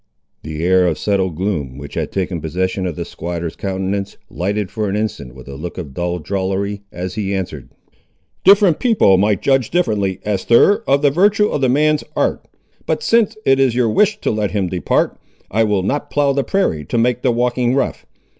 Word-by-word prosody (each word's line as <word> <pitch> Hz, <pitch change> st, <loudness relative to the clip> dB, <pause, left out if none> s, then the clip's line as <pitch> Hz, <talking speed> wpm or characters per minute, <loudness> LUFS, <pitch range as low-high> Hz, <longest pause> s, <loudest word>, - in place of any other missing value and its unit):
The 80 Hz, 0 st, -5 dB
air 90 Hz, 0 st, +4 dB
of 80 Hz, -3 st, 0 dB
settled 95 Hz, -4 st, 0 dB
gloom, 80 Hz, -8 st, -3 dB
which 70 Hz, 0 st, -9 dB
had -, -, -3 dB
taken 90 Hz, -3 st, -2 dB
possession 95 Hz, +4 st, -2 dB
of 85 Hz, -, -4 dB
the -, -, -4 dB
squatter's 85 Hz, -1 st, -5 dB
countenance, 95 Hz, +1 st, -3 dB
lighted 100 Hz, +1 st, -2 dB
for 105 Hz, -2 st, -2 dB
an 95 Hz, -, -2 dB
instant 105 Hz, -, -4 dB
with -, -, -13 dB
a 70 Hz, -, -8 dB
look 80 Hz, +5 st, -7 dB
of 75 Hz, -7 st, -7 dB
dull 85 Hz, +3 st, -2 dB
drollery, 100 Hz, +3 st, -2 dB
as 90 Hz, +1 st, -5 dB
he 100 Hz, -1 st, -2 dB
answered— 85 Hz, -8 st, -5 dB, 0.7 s
"Different 195 Hz, -4 st, +5 dB
people 205 Hz, -, +4 dB
might 105 Hz, -1 st, +1 dB
judge 135 Hz, -4 st, +2 dB
differently, 105 Hz, -, 0 dB
Esther, 115 Hz, -, +3 dB
of 140 Hz, +1 st, +3 dB
the 145 Hz, -, +4 dB
virtue 205 Hz, +6 st, +3 dB
of 145 Hz, -, -2 dB
the 130 Hz, -, +3 dB
man's 150 Hz, +3 st, +2 dB
art. -, -, 0 dB, 0.4 s
But -, -, -1 dB
sin' 230 Hz, -2 st, +4 dB, 0.2 s
it 135 Hz, 0 st, +4 dB
is 130 Hz, -3 st, +3 dB
your 120 Hz, -2 st, +2 dB
wish 210 Hz, -, +2 dB
to -, -, 0 dB
let 105 Hz, -2 st, -1 dB
him 100 Hz, -4 st, -1 dB
depart, 90 Hz, -1 st, 0 dB, 0.3 s
I 115 Hz, +3 st, +2 dB
will 105 Hz, -3 st, 0 dB
not 145 Hz, +9 st, -2 dB
plough 145 Hz, -1 st, +2 dB
the 140 Hz, 0 st, 0 dB
prairie 160 Hz, -, 0 dB
to 120 Hz, -, -2 dB
make 125 Hz, +1 st, +1 dB
the 130 Hz, -, +2 dB
walking 120 Hz, +1 st, +1 dB
rough. 140 Hz, -, -2 dB
100 Hz, 195 wpm, -18 LUFS, 90-135 Hz, 0.7 s, Different